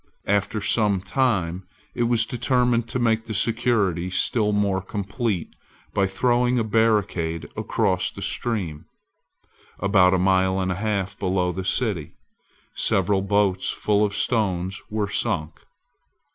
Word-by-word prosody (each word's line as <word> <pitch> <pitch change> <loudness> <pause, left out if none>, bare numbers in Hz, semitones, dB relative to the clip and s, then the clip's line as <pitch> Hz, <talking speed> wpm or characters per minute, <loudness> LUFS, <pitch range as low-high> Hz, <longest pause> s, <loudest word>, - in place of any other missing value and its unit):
After 100 +2 0
some 105 -1 +2
time 95 -5 -1 0.3
it 120 -1 0
was 115 -1 +2
determined 125 -2 +1
to - - -2
make 115 -2 +1
the 110 - -4
security 110 -6 +1
still 105 +4 +1
more 100 -2 +1
complete 100 0 -3 0.4
by 100 -1 +2
throwing 120 +5 +1
a 115 - +2
barricade 105 -7 0
across - - 0
the - - -8
stream, 95 -11 -2 0.9
about 95 -1 +4
a - - +2
mile 95 0 +2
and 95 -1 -1
a 90 +2 -4
half 100 -3 -2
below 90 -2 0
the 95 +1 -5
city. 95 - 0 0.6
Several 95 +1 +1
boats 100 -1 +1
full 105 0 +1
of 100 -1 -1
stones 95 -5 0
were 105 -2 -1
sunk. 80 -4 -2
100 Hz, 130 wpm, -23 LUFS, 95-115 Hz, 0.9 s, about